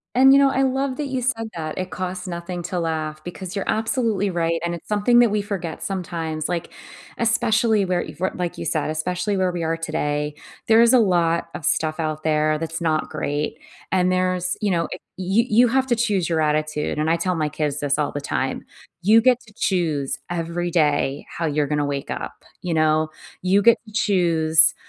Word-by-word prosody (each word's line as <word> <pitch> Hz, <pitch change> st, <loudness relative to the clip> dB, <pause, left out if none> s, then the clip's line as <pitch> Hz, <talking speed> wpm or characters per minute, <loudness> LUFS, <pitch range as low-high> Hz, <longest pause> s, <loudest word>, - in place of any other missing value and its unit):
And 265 Hz, +2 st, +7 dB
you 275 Hz, -, +7 dB
know, 275 Hz, -1 st, +5 dB
I 270 Hz, 0 st, +1 dB
love 265 Hz, 0 st, 0 dB
that 295 Hz, +1 st, -3 dB
you 260 Hz, -1 st, -2 dB
said 225 Hz, -3 st, -1 dB
that 155 Hz, -2 st, -5 dB
"It 185 Hz, 0 st, -4 dB
costs 185 Hz, 0 st, -4 dB
nothing 175 Hz, 0 st, -5 dB
to 180 Hz, +1 st, -3 dB
laugh," 155 Hz, -2 st, -3 dB
because 180 Hz, +1 st, -7 dB
you're 200 Hz, -2 st, -3 dB
absolutely 220 Hz, -3 st, 0 dB
right, 165 Hz, -2 st, -1 dB
and 170 Hz, -, -1 dB
it's 170 Hz, -, -8 dB
something 215 Hz, +3 st, +3 dB
that 240 Hz, -1 st, +5 dB
we 210 Hz, 0 st, 0 dB
forget 190 Hz, -5 st, -5 dB
sometimes. 165 Hz, -5 st, -3 dB
Like, 175 Hz, -1 st, -3 dB, 0.5 s
especially 225 Hz, -2 st, +2 dB
where, 180 Hz, -2 st, 0 dB
if 165 Hz, -, -9 dB
your 190 Hz, -, +1 dB
like 175 Hz, -1 st, -4 dB
you -, -, -5 dB
said, 155 Hz, -2 st, -1 dB
especially 180 Hz, +5 st, -1 dB
where 185 Hz, -1 st, +1 dB
we 175 Hz, -1 st, -3 dB
are 165 Hz, 0 st, 0 dB
today, 150 Hz, -2 st, -2 dB, 0.3 s
there 225 Hz, 0 st, +6 dB
is 235 Hz, +1 st, +5 dB
a 255 Hz, -, +7 dB
lot 170 Hz, -5 st, +2 dB
of 155 Hz, -, -6 dB
stuff 155 Hz, +1 st, +1 dB
out 155 Hz, -1 st, -2 dB
there 155 Hz, 0 st, +2 dB
that's 165 Hz, +1 st, -4 dB
not 160 Hz, -2 st, 0 dB
great. 150 Hz, 0 st, -3 dB, 0.3 s
And 185 Hz, -1 st, +2 dB
there's 185 Hz, 0 st, 0 dB
you 205 Hz, -2 st, +1 dB
know, 170 Hz, -2 st, +1 dB
eh -, -, -6 dB, 0.2 s
you 190 Hz, +5 st, +2 dB
you 240 Hz, +3 st, +5 dB
have 260 Hz, +3 st, +2 dB
to 240 Hz, -2 st, +1 dB
choose 205 Hz, -7 st, 0 dB
your 165 Hz, -, +1 dB
attitude, 155 Hz, 0 st, 0 dB
and 155 Hz, +1 st, 0 dB
I 165 Hz, -, +3 dB
tell 180 Hz, +2 st, -1 dB
my 155 Hz, -2 st, 0 dB
kids 150 Hz, -1 st, -2 dB
this 145 Hz, 0 st, +1 dB
all 150 Hz, -, -1 dB
the 145 Hz, -, -3 dB
time, 130 Hz, -2 st, -2 dB, 0.4 s
"You 215 Hz, +5 st, +6 dB
get 250 Hz, +1 st, +3 dB
to 215 Hz, -, -19 dB
choose 160 Hz, -7 st, 0 dB
every 175 Hz, 0 st, -2 dB
day 145 Hz, -4 st, +1 dB
how 165 Hz, -, -4 dB
you're 150 Hz, -1 st, 0 dB
gonna 150 Hz, 0 st, 0 dB
wake 140 Hz, 0 st, -4 dB
up, -, -, -6 dB, 0.2 s
you 175 Hz, -2 st, -2 dB
know? 155 Hz, 0 st, +2 dB, 0.3 s
You 190 Hz, +2 st, +3 dB
get 235 Hz, +2 st, +6 dB
to 215 Hz, -, -14 dB
choose 165 Hz, -7 st, +4 dB
175 Hz, 210 wpm, -22 LUFS, 155-205 Hz, 0.5 s, And